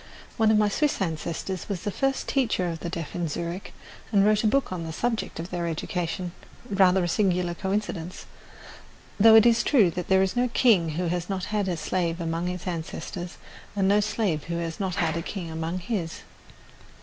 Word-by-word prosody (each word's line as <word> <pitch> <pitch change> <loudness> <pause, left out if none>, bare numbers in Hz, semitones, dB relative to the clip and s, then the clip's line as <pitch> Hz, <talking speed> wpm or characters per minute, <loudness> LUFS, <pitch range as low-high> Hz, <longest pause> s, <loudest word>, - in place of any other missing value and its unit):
One 220 -1 +3
of 215 - +5
my 210 0 +4
Swiss 295 +8 +1
ancestors 170 +2 -3
was 190 -4 -3
the 205 - -1
first 270 +5 -1
teacher 230 -9 +1
of 165 - -6
the 170 - -4
deaf 165 -2 -5
in 175 -1 -1
Zurich 170 +5 -4 0.4
and 200 -2 +4
wrote 215 +1 +3
a - - +4
book 275 +2 +1
on 180 -2 -3
the 160 - -5
subject 225 +1 -2
of 170 +2 -6
their 175 -1 -2
education 175 +2 -3 0.4
rather 190 -1 +4
a - - 0
singular 180 -1 +1
coincidence; 190 -2 -3 0.9
though 220 +2 +8
it 225 0 +8
is 235 0 +5
true 215 - +4
that 180 +1 -4
there 190 0 +4
is 190 - -1
no 245 +1 +2
king 195 -10 +4
who 180 - 0
has 175 +1 -2
not 190 -1 -2
had 205 -2 +1
a 175 -2 -1
slave 170 +1 -1
among 165 +1 -2
his 180 -1 -4
ancestors, 175 0 -5 0.4
and 195 -2 +2
no 205 +1 +5
slave 205 -7 -1
who 170 - -3
has 165 -1 -4
not 190 -2 -1
had 170 -4 0
a 165 - -1
king 170 -1 -5
among 160 +2 -3
his. 180 -4 -3
180 Hz, 200 wpm, -26 LUFS, 170-205 Hz, 0.9 s, though